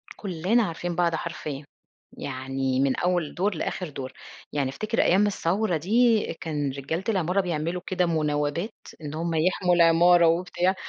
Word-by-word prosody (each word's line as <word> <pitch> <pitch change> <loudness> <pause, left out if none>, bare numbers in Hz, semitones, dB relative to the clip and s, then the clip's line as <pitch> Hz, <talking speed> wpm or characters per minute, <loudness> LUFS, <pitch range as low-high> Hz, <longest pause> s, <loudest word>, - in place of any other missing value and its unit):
كُلّنا 195 +5 +1
عارفين 175 -2 -3
بعض 170 -2 +2
حرفيًا، 155 -4 -5 0.5
يعني 130 0 -2
من 135 -1 +2
أول 175 -4 0
دور، 195 +2 0
لآخر 175 +1 -3
دور. 135 -2 -7 0.4
يعني 140 -3 0
أفتكر 215 - -1
أيام 195 +4 +4
الثورة 195 -1 0
دي، 225 +6 +3 0.2
كان 150 -3 -2
رجالة 140 +7 -4
العمارة 190 -1 +1
بيعملوا 175 0 -2
كده 180 -1 +1
مناوبات 155 +4 -1 0.3
إن 150 -1 -6
هُم 165 +1 -2
يحموا 180 +2 +2
العمارة 170 +1 +6
وبتاع، 180 +2 +1
170 Hz, 145 wpm, -25 LUFS, 150-185 Hz, 0.5 s, العمارة